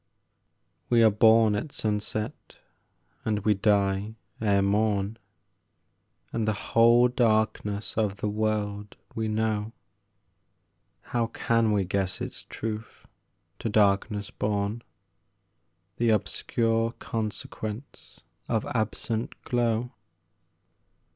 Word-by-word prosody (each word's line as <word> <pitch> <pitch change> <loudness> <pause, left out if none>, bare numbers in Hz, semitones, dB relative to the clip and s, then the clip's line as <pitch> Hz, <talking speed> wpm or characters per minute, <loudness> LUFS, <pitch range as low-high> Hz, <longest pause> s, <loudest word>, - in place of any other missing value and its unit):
We 120 -1 +5
are 110 - +6
born 110 +1 +5
at 105 +8 -3
sunset 105 -1 -3 0.7
and 105 -2 0
we 105 - +5
die 100 +1 +1 0.3
ere 100 -2 +3
morn, 105 +1 +1 1.2
And 110 -2 -1
the 110 - +2 0.2
whole 120 +2 +6
darkness 110 -4 0
of 105 -3 0
the 105 - -3
world 105 -1 -2 0.2
we 110 -1 -2
know, 110 0 -1 1.3
How 120 -1 -1
can 115 -1 +1
we 100 -2 +2
guess 95 0 -1
its - - -6
truth, 110 0 -6 0.5
to - - -2
darkness 105 0 +2
born, 105 +2 -1 1.2
The 120 0 +2
obscure 115 +2 +1
consequence 110 +2 -6 0.3
of 110 -2 0
absent 115 0 -2
glow? 120 0 0
110 Hz, 95 wpm, -27 LUFS, 105-115 Hz, 1.3 s, are